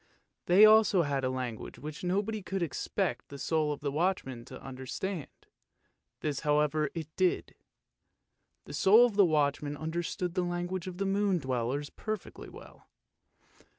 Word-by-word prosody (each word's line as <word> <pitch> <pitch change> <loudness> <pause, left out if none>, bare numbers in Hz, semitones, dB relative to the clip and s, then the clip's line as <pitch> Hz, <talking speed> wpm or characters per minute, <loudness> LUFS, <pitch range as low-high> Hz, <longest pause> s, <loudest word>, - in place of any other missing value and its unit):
They 190 +5 +8
also 215 -4 +6
had 140 -2 -1
a 130 - +1
language 125 -3 -5
which 150 +3 -8
nobody 205 +4 -1
could 190 -1 -2
expect 160 - -2
the 140 - -8
soul 155 +1 0
of 145 - -5
the 140 -1 -2
watchman 145 -7 -1
to - - -10
understand, 135 +6 -5 0.9
this 145 -3 -2
however 150 0 +1
it 155 -2 -6
did. 185 -2 0 1.1
The - - -9
soul 200 +11 +6
of 235 -4 -2
the 200 - +6
watchman 145 -2 0
understood 170 +2 -3
the 185 - 0
language 175 +1 -3
of 180 -1 -6
the 195 - -1
moon 195 -1 +2
dwellers 130 0 -2
perfectly 215 -3 -6
well. - - -14
160 Hz, 150 wpm, -30 LUFS, 145-190 Hz, 1.1 s, They